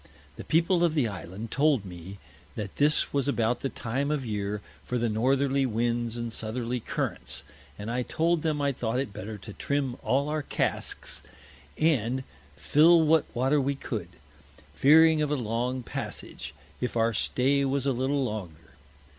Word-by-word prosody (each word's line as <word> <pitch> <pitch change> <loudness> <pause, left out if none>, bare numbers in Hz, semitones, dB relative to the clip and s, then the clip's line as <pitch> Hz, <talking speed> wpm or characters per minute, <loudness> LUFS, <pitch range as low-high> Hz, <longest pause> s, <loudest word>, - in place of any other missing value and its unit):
The - - -8
People 170 +2 +2
of 165 -2 +2
the 140 -6 +3
Island 100 +3 -7
told 140 -7 +3
me, 90 +1 -9 0.4
that 105 -3 -5
this 150 +1 +2
was 140 -1 +1
about 120 -3 +1
the 135 - -2
time 130 +5 -2
of 150 -4 -1
Year 105 -1 -2 0.2
for 125 - -2
the 120 -1 +1
Northerly 135 +5 +2
Winds 120 0 -1
and 120 -1 -3
Southerly 120 +3 -2
Currents, 75 - -3 0.3
and 105 +3 -5
I 125 +1 0
told 165 +5 +1
him 150 -3 0
I 140 - +2
thought 120 -2 -2
it 130 -6 -2
better 105 +2 -6
to 105 +1 -9
trim 140 -1 -1
all 140 +2 +1
our 155 0 -1
Casks, - - -2 0.6
and 130 -5 +2 0.3
fill 155 - +5
what 160 +1 +4
Water 135 +4 +3
we 140 +1 0
could, 110 -10 -5 0.6
fearing 155 - +6
of 150 - +1
a 150 - +1
long 125 +1 -2
Passage, - - -6 0.2
if 125 -1 -2
our 115 0 +2
Stay 135 +7 +2
was 135 0 0
a 140 - +3
little 135 +3 0
longer. 90 - -6
125 Hz, 165 wpm, -28 LUFS, 110-140 Hz, 0.6 s, fearing